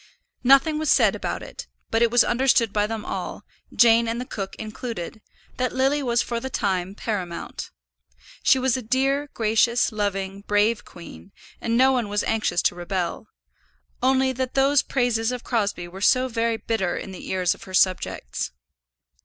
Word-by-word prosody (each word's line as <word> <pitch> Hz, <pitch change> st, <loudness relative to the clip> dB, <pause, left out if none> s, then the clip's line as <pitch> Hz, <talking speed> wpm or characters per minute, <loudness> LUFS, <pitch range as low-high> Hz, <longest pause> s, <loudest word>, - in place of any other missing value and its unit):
Nothing 275 Hz, +4 st, +5 dB
was 310 Hz, -, -1 dB
said -, -, +4 dB
about -, -, -4 dB
it; -, -, -9 dB, 0.2 s
but 225 Hz, -, +2 dB
it 235 Hz, -, +5 dB
was 240 Hz, 0 st, +5 dB
understood 240 Hz, -3 st, +2 dB
by 210 Hz, 0 st, +1 dB
them 220 Hz, -1 st, -5 dB
all, -, -, -5 dB, 0.3 s
Jane 230 Hz, 0 st, +5 dB
and 230 Hz, +1 st, -2 dB
the 250 Hz, -, -4 dB
cook 195 Hz, -5 st, -6 dB
included, 220 Hz, -2 st, -6 dB, 0.4 s
that 255 Hz, 0 st, -1 dB
Lily 270 Hz, +3 st, +2 dB
was 240 Hz, -3 st, +1 dB
for 235 Hz, -1 st, -3 dB
the 265 Hz, +3 st, -5 dB
time 190 Hz, -5 st, -1 dB
paramount. 190 Hz, -7 st, -5 dB, 0.7 s
She -, -, +5 dB
was 260 Hz, -1 st, +1 dB
a 260 Hz, -, -2 dB
dear, 270 Hz, +4 st, 0 dB
gracious, 230 Hz, +2 st, +2 dB
loving, 200 Hz, -2 st, -2 dB
brave 210 Hz, +2 st, +1 dB
queen, 175 Hz, +2 st, -12 dB, 0.3 s
and 230 Hz, 0 st, 0 dB
no 260 Hz, +1 st, +5 dB
one 245 Hz, -5 st, 0 dB
was 205 Hz, +1 st, 0 dB
anxious 220 Hz, -5 st, 0 dB
to -, -, +2 dB
rebel; 175 Hz, +2 st, -3 dB, 0.7 s
only 260 Hz, +1 st, +3 dB
that 260 Hz, 0 st, -3 dB
those 275 Hz, +1 st, +4 dB
praises 245 Hz, -3 st, 0 dB
of 250 Hz, -1 st, -5 dB
Crosbie 205 Hz, -7 st, -1 dB
were 185 Hz, +3 st, -10 dB
so 255 Hz, +4 st, +4 dB
very 230 Hz, -1 st, 0 dB
bitter 205 Hz, -6 st, -1 dB
in 195 Hz, -, -6 dB
the 185 Hz, -, -9 dB
ears 185 Hz, -1 st, +1 dB
of -, -, -14 dB
her 185 Hz, -, -11 dB
subjects. 185 Hz, -, 0 dB
230 Hz, 170 wpm, -24 LUFS, 200-255 Hz, 0.7 s, Nothing